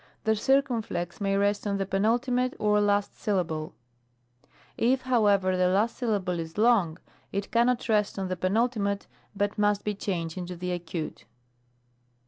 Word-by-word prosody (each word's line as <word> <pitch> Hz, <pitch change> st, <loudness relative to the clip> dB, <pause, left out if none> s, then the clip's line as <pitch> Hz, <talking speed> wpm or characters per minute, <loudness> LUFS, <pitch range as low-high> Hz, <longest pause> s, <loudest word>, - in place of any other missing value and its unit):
The 220 Hz, 0 st, +2 dB
circumflex 225 Hz, -8 st, 0 dB
may 195 Hz, 0 st, +1 dB
rest 205 Hz, +1 st, +1 dB
on 200 Hz, -1 st, 0 dB
the 195 Hz, -, -1 dB
penult, 220 Hz, +7 st, +1 dB, 0.3 s
or 210 Hz, 0 st, +2 dB
last 205 Hz, 0 st, +1 dB
syllable; 165 Hz, -6 st, -1 dB, 1.0 s
if, 255 Hz, +3 st, +2 dB
however, 205 Hz, -7 st, +3 dB
the 180 Hz, 0 st, +3 dB
last 205 Hz, +5 st, +1 dB
syllable 200 Hz, -7 st, -1 dB
is 165 Hz, +2 st, -6 dB
long, 210 Hz, -8 st, +3 dB, 0.3 s
it 200 Hz, 0 st, -3 dB
cannot 235 Hz, +1 st, +2 dB
rest 210 Hz, -3 st, +1 dB
on 190 Hz, -1 st, -2 dB
the 185 Hz, -, -2 dB
penult, 220 Hz, +8 st, +1 dB, 0.6 s
but 205 Hz, +1 st, -1 dB
must 205 Hz, -1 st, +2 dB
be 210 Hz, -, -1 dB
changed 180 Hz, -4 st, -3 dB
into 180 Hz, 0 st, -5 dB
the 180 Hz, +1 st, -4 dB
acute. 175 Hz, -2 st, -5 dB
200 Hz, 145 wpm, -27 LUFS, 185-220 Hz, 1.0 s, however